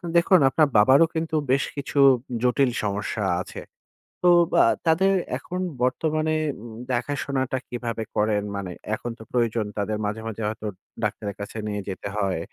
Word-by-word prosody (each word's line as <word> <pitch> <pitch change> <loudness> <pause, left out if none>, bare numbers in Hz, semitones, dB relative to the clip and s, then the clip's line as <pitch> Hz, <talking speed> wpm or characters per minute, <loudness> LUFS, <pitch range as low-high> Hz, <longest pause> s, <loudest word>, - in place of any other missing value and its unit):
দেখুন 175 +2 +6
আপনার 150 +3 +3
বাবারও 130 +10 +7
কিন্তু 160 0 -1 0.2
বেশ 135 +1 +3
কিছু 140 0 -2 0.4
জটিল 125 +1 +3
সমস্যা 105 +1 -2 0.2
আছে। - - -8 0.6
তো 180 - +6 0.3
আ - - +5 0.2
তাদের 190 +5 +4 0.3
এখন 180 +1 -6 0.2
বর্তমানে 155 +4 +1 0.3
উম 115 -2 -9 0.2
দেখাশোনাটা 130 +1 -1
কিভাবে 115 -2 -3
করেন? 105 -1 +1
মানে 95 -2 -4 0.2
এখন 120 +2 -5
তো - - -11
প্রয়োজন 115 -2 +1
তাদের। 105 +1 -1
মাঝে, 105 +2 -3
মাঝে 110 0 -5
হয়তো 110 0 -5 0.4
ডাক্তারের 100 -2 -2
কাছে 100 +2 -6
নিয়ে 105 -1 -2
যেতে 95 +1 -5
হয়। 95 -4 0
120 Hz, 150 wpm, -24 LUFS, 105-145 Hz, 0.6 s, বাবারও